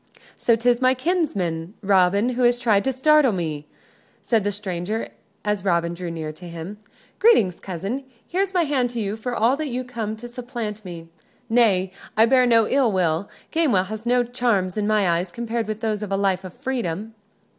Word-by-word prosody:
"So, 230 - +3
'tis 240 +2 +2
my 255 0 +4
kinsman, 205 - -1
Robin, 200 +3 +3
who 250 0 -2
has 240 0 +4
tried 220 -5 +2
to 265 - +2
startle 285 +1 +4
me?" 155 -5 -3 0.6
said 225 -4 +2
the 205 - 0
stranger, 200 +1 -4 0.4
as 210 -2 0
Robin 170 -3 +1
drew 175 0 -5
near 160 -2 -4
to 175 +3 -12
him. 170 +5 -7 0.4
"Greetings, 225 - +4
cousin; 195 +9 -4 0.2
here's 380 +2 0
my 360 -2 +2
hand 270 -5 +1
to 240 -1 -5
you 205 -1 -2
for 240 +2 -4
all 235 +4 +3
that 310 0 -3
you 250 +1 -2
come 230 -4 -4
to 235 +2 -9
supplant 240 -3 -6
me. 170 -3 -9 0.4
Nay! 205 -6 +3 0.3
I 220 - +7
bear 255 +1 +4
no 230 -2 +4
ill 265 -5 +3
will. 180 0 0 0.2
Gamewell 270 - +2
has 220 +2 -6
no 245 0 +3
charms 235 -7 0
in 210 -1 -1
my 215 -3 +2
eyes 175 +1 0
compared 230 +1 -3
with 215 0 -4
those 215 -2 -1
of 210 -2 -5
a 195 - +1
life 195 -1 +1
of 185 -2 -9
freedom." 225 -6 -3
215 Hz, 190 wpm, -23 LUFS, 185-245 Hz, 0.6 s, I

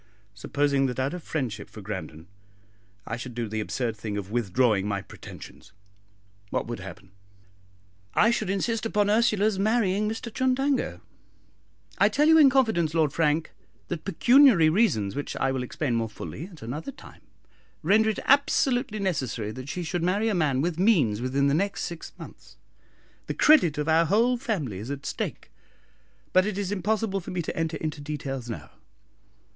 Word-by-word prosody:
"Supposing 140 +6 0
that 125 - -4
out 135 +4 -1
of 180 - -5
friendship 120 -11 -4
for - - -11
Grandon 80 -5 -6 0.8
I 115 - -4
should 120 0 -8
do 120 -1 -2
the 110 +1 -3
absurd 115 +1 -2
thing 105 -1 -5
of 100 0 -6
withdrawing 110 -2 +1
my 100 -2 -2
pretensions, - - -12 0.8
what - - -1
would 120 -1 -5
happen?" 95 0 -10 1.0
"I 220 - +5
should 215 -4 -1
insist 220 +3 -1
upon 205 -2 +1
Ursula's 215 -2 +2
marrying 210 -1 +1
Mr 225 +1 -6
Chundango. 260 +2 0 1.0
I - - +5
tell 295 +2 +2
you 320 0 +7
in 285 -3 +8
confidence, 220 - +1
Lord 155 -3 +2
Frank, 155 0 +1 0.4
that 175 -3 -4
pecuniary 235 - +5
reasons, 155 - +1
which 145 - -4
I 135 - 0
will 130 -1 -2
explain 125 +1 -2
more 115 -1 0
fully 110 - -7
at 170 - -13
another 145 - -5
time, - - -15 0.6
render 215 +6 +4
it 215 - -2
absolutely 265 -4 +2
necessary 130 - -2
that 130 +4 -8
she 180 - -3
should 175 +1 -2
marry 200 +6 +1
a - - 0
man 150 -7 +1
with 170 +1 -2
means 150 - +3
within 135 +2 0
the 140 - +3
next 200 +6 0
six 170 -1 -6
months. - - -13 0.7
The - - -3
credit 180 - +5
of 150 +1 -2
our 165 +1 +4
whole 230 +8 +3
family 185 - -3
is 110 +5 -7
at 140 0 -5
stake; - - -5 0.8
but 185 +2 +4
it 210 -2 -3
is 200 -1 -2
impossible 205 +1 -1
for 175 - -9
me 180 -1 -2
to - - -5
enter 165 -1 -2
into 155 -2 -4
details 140 -4 -5
now." 115 - -7
160 Hz, 170 wpm, -26 LUFS, 125-210 Hz, 1.0 s, in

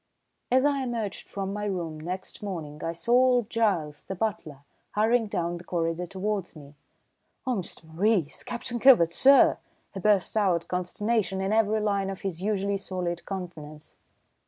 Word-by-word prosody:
As 260 +2 +4
I 285 -1 +2
emerged 230 -6 -3
from 195 -1 -4
my 210 0 -3
room 170 -6 -3
next 180 +4 -6
morning 160 -7 -6
I 165 - -1
saw 170 +7 -4
old 250 -2 +4
Giles, 175 -11 0
the 190 - -6
butler, 175 -9 -3 0.3
hurrying 225 +2 +2
down 175 -3 -2
the 170 - -11
corridor 170 0 -2
towards 195 0 -3
me. 145 -2 -12 0.7
"Oh, 255 -3 0
Mr. 180 -3 -5
Maurice 170 +1 0
Captain 240 -1 -4
Kilvert, 230 -11 +7
sir!" 270 +10 +6 0.3
he 195 - -5
burst 205 0 +2
out, 180 -6 +2
consternation 190 +3 -1
in 195 +2 0
every 220 -1 +3
line 200 -2 0
of 195 - -6
his 185 -3 -4
usually 200 -1 0
stolid 180 -3 -4
countenance. 160 -6 -7
195 Hz, 160 wpm, -27 LUFS, 170-220 Hz, 0.7 s, Kilvert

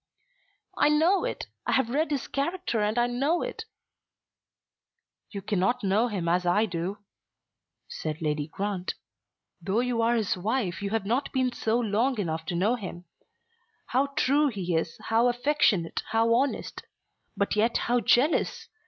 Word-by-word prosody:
"I - - +4
know 335 +9 +3
it. - - -4 0.2
I - - +1
have 250 -3 +2
read 305 +4 +1
his 285 -4 -2
character 280 -5 -1
and 210 +2 0
I 240 - +4
know 275 +8 0
it." 475 -2 -5 1.6
"You 200 -2 -7
cannot 210 +4 0
know 205 +5 +2
him 195 -7 -3
as 175 +2 +2
I 180 +5 +3
do," 180 +1 -3 0.9
said 155 -1 -5
Lady 150 -2 -1
Grant. 190 +2 -3 0.7
"Though 195 +7 0
you 245 -2 0
are 230 +1 +3
his 220 -4 0
wife 195 -1 -2
you 200 - -2
have 220 -1 -1
not 245 +7 0
been 260 -2 +1
so 230 -1 0
long 235 +3 +1
enough 160 -5 -3
to 175 - -2
know 200 +7 +2
him; 185 -7 -6 0.8
how 265 +3 +2
true 290 +3 +3
he 185 -9 -2
is, 160 0 -1
how 230 +2 +4
affectionate, 245 - +1
how 225 +1 +3
honest; 265 +4 -1 0.6
but 200 - 0
yet 225 +3 +2
how 245 +1 +2
jealous! 260 +6 +2
225 Hz, 155 wpm, -27 LUFS, 190-255 Hz, 1.6 s, I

